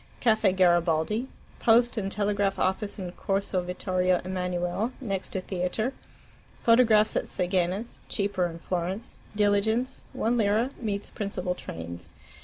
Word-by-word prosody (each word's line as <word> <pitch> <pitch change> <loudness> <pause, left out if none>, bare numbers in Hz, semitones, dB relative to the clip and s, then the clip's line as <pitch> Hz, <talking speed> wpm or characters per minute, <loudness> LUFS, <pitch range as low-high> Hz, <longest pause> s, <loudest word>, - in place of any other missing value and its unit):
* - - -27
Caffe 220 -4 +4
Garibaldi. 175 +5 +3 0.3
Post 235 +1 +4
and 195 -3 -2
Telegraph 205 -1 +1
office 200 +2 0
in 185 -3 -5
Corso 195 0 -1
Vittorio 180 0 0
Emmanuele, 180 +4 -1
next 195 -8 -3
to 190 - -1
theatre. 185 +7 -2 0.7
Photographs 225 -3 +5
at - - +1
Seghena's 185 +4 -1
(cheaper 200 -3 0
in 165 -1 -7
Florence). 180 +5 -2 0.2
Diligence 210 +4 +2
(1 235 +2 +1
lira) 220 +5 +2
meets 205 -3 -3
principal 195 -4 -2
trains. 85 - -8
195 Hz, 125 wpm, -27 LUFS, 180-220 Hz, 0.7 s, Photographs